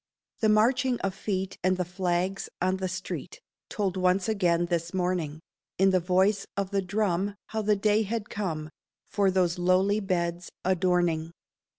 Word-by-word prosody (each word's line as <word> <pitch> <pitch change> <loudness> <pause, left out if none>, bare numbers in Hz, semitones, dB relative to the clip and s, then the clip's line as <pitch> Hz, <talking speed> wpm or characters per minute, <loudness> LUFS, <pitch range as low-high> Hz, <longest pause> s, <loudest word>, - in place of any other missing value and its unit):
The 220 - +3
marching 245 +4 +3
of 195 -1 -1
feet 190 -1 -3
and 185 0 +2
the 180 - -1
flags 180 +1 -1
on 185 +1 +1
the 190 0 -2
street 190 - -5 0.3
Told 195 -3 -1
once 185 +1 +2
again 175 -5 +2
this 170 +1 -2
morning, 175 -4 -1 0.4
In 195 +1 +4
the 185 - +3
voice 190 +3 +2
of 200 -1 -1
the 200 -1 +1
drum 200 0 0
how 220 - -2
the 210 0 +2
day 210 +2 +2
had 220 0 -3
come 160 -7 -4 0.4
For 200 -2 +2
those 180 -2 +1
lowly 185 +4 +3
beds' 175 -3 -2 0.2
adorning. 175 -3 +1
185 Hz, 160 wpm, -27 LUFS, 175-200 Hz, 0.4 s, In